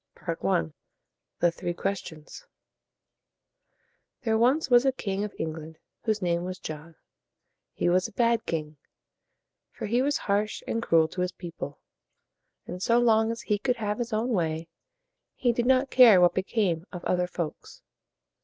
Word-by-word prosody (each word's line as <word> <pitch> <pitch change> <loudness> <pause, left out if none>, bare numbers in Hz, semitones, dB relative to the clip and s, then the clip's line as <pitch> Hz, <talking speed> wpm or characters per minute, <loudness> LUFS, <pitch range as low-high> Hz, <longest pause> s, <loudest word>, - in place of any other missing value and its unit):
I. 80 -1 0 0.7
THE 175 - +4
THREE 175 +1 -4
QUESTIONS. 195 - -5 1.8
There 225 -3 +1
was 260 +5 +2
once 240 0 +7
a 270 - +3
king 200 -5 -3
of 210 - -6
England 160 0 -5 0.3
whose 215 -3 0
name 170 -1 0
was 185 +1 -5
John. 155 -1 -8 0.8
He - - 0
was 180 +1 +3
a - - -14
bad 235 0 +1
king; 155 -2 -3 0.9
for - - -7
he 235 +4 +1
was 285 +2 +1
harsh 205 +1 -1
and 230 - -2
cruel 165 -7 +3
to 180 - -4
his 180 0 0
people, 170 -6 -8 0.9
and 180 - -7
so 235 +4 +3
long 225 -2 +4
as 230 - -6
he 210 -2 0
could 250 +3 0
have 210 -1 -3
his 240 0 -3
own 220 +3 0
way, 165 -6 -1 0.7
he 245 - +2
did 240 +1 -1
not 265 +1 +3
care 235 -7 +8
what 175 -1 +5
became 190 -3 -1
of 180 -2 -8
other 180 0 +1
folks. 170 -3 -6
200 Hz, 155 wpm, -27 LUFS, 170-235 Hz, 1.8 s, care